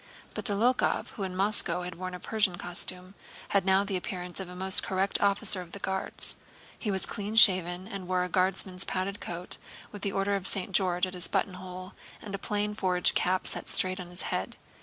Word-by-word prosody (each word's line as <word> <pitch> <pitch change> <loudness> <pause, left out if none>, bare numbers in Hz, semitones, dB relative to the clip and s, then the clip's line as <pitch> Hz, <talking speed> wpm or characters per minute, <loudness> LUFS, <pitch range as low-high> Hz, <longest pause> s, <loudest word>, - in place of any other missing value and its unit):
But - - -4
Dólokhov, 235 +4 +2
who 210 - -8
in 185 -1 -3
Moscow 190 -3 +1
had 180 0 -5
worn 185 +1 -5
a - - -7
Persian 210 -2 +1
costume, 180 +1 -4 0.4
had 200 -2 +2
now 190 +1 +4
the 200 -1 -2
appearance 180 0 -4
of 190 -2 -6
a 180 - -9
most 190 +1 +4
correct 190 0 0
officer 200 -1 +2
of 170 -1 -12
the - - -4
Guards. 190 0 0 0.4
He 215 - -2
was 190 -2 +4
clean 210 0 -4
shaven 185 -4 +5
and 195 -4 -6
wore 180 0 +1
a - - -1
Guardsman's 185 +1 +1
padded 195 +2 -3
coat 175 +1 -3 0.3
with 205 - -9
an 200 - 0
Order 195 +1 +1
of 195 -1 0
St. 195 0 +1
George 180 -1 +3
at 185 - -7
his 180 -2 +1
buttonhole 185 0 -3 0.3
and 205 - -8
a 195 - -3
plain 210 +1 -1
forage 180 -3 +2
cap 185 +1 +1
set - - -2
straight 185 0 +2
on 180 - -6
his 180 +1 0
head. - - -3
185 Hz, 205 wpm, -29 LUFS, 180-200 Hz, 0.4 s, shaven